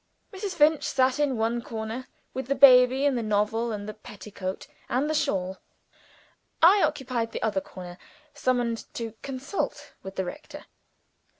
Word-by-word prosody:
Mrs. 385 -1 -4
Finch 305 -1 +4
sat 260 +1 +1
in 280 -4 +1
one 230 +2 0
corner, 225 +2 -5 0.3
with 260 -1 -4
the 275 - +1
baby 260 0 +7
and 280 -2 +3
the 240 - -1
novel, 215 +2 0
and 205 -1 -5
the 215 - -5
petticoat 205 -2 -7 0.2
and 265 +4 +1
the 310 - 0
shawl. 190 -10 -1 1.0
I 380 +5 +7
occupied 255 -8 -1
the - - -4
other 205 -3 0
corner; 180 -1 -10 0.3
summoned 240 -3 -1
to 230 -2 -4
"consult 270 +7 -4
with 190 0 -9
the 190 - -1
rector." 295 +12 -9
240 Hz, 155 wpm, -26 LUFS, 215-275 Hz, 1.0 s, baby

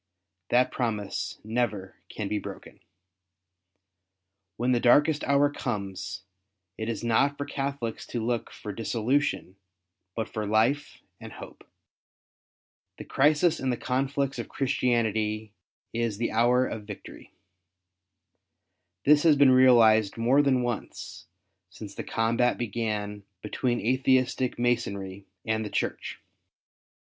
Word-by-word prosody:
That 125 +1 +3
promise 105 -5 -3
never 110 -4 -2
can 105 - -4
be 105 +1 -1
broken. - - -10 1.8
When 125 +2 +1
the 120 - +3
darkest 145 +5 +4
hour 140 +1 +4
comes, 100 -7 -4 0.5
it 110 +1 -4
is 115 - -4
not 135 +5 +2
for 145 - -3
Catholics 135 -5 -4
to 120 - -3
look 120 -1 -1
for 105 - -7
dissolution, 115 -1 -1 0.6
but 110 -1 -2
for 110 -1 -4
life 115 +8 +1 0.2
and - - -10
hope. - - -12 1.3
The - - -7
crisis 155 +4 +3
in 130 - -1
the 125 - 0
conflicts 135 +1 -1
of - - -5
Christianity 110 -5 0 0.4
is 115 -3 -1
the 115 +1 -1
hour 120 +3 +3
of 110 -4 -6
victory. 105 -2 -11 1.7
This 150 +1 +6
has 160 -2 +5
been 140 -2 +6
realized 115 -5 +5
more 125 +5 +4
than 130 -3 +2
once 120 -7 -5 0.4
since 100 +1 -10
the - - -6
combat 115 +2 +1
began 105 -3 -3 0.2
between 120 +3 -1
Atheistic 130 +1 +1
Masonry 100 -5 -2 0.2
and 110 0 0
the 105 - -5
Church. - - -3
120 Hz, 120 wpm, -27 LUFS, 110-130 Hz, 1.8 s, This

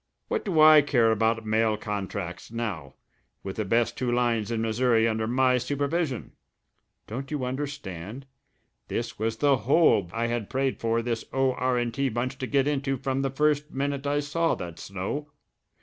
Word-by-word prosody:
What - - -1
do 180 -6 0
I 155 -1 +9
care 120 -6 +3
about 110 +1 +1
mail 110 0 +2
contracts 100 -3 -5
now 100 - -4 0.5
with 95 -1 -6
the 110 - 0
best 115 +3 +1
two 125 -2 -1
lines 120 -3 +1
in 115 -1 -1
Missouri 115 0 +2
under 110 0 -1
my 125 +1 +3
supervision? 140 +1 -2 0.7
Don't 130 +5 -6
you 145 -4 -2
understand? 130 - -5 0.6
This 115 -2 -4
was 110 +1 -1
the 140 0 +3
hole 135 +2 +4
that 85 - -13
I 115 +1 0
had 120 -3 -2
prayed 135 0 -1
for 115 0 0
this 115 -1 -2
O.R. 130 -2 +1
& - - -7
T. 135 +3 0
bunch 125 +3 -3
to 130 - -3
get 140 0 +2
into 135 -2 0
from 135 +1 -1
the 135 - 0
first 150 +2 +1
minute 140 0 -2
I 145 +1 +1
saw 165 +3 0
that 85 -2 -7
snow. 100 +11 -4
125 Hz, 175 wpm, -27 LUFS, 110-140 Hz, 0.7 s, I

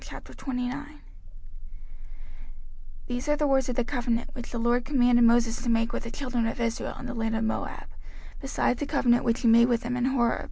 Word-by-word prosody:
05:029:001 270 +3 -6 2.1
These 245 +3 -4
are 295 - +4
the 295 0 0
words 270 -2 +2
of 250 - -2
the 245 - +1
covenant, 240 -2 -2
which 240 -1 -8
the 240 - -5
LORD 240 +1 +1
commanded 245 -3 +3
Moses 235 0 +3
to 245 - -3
make 230 0 +1
with - - -2
the - - -5
children 245 -3 -2
of 230 - -4
Israel 230 -1 -2
in - - -8
the - - -5
land 225 -1 -2
of 225 - -1
Moab, 220 - -3 0.5
beside 270 -2 0
the 290 - -3
covenant 240 -3 +2
which 230 0 0
he 240 - +2
made 230 +1 +6
with 240 -2 +1
them 245 +1 -3
in 250 0 0
Horeb. 245 -3 +1
240 Hz, 200 wpm, -27 LUFS, 230-255 Hz, 2.1 s, made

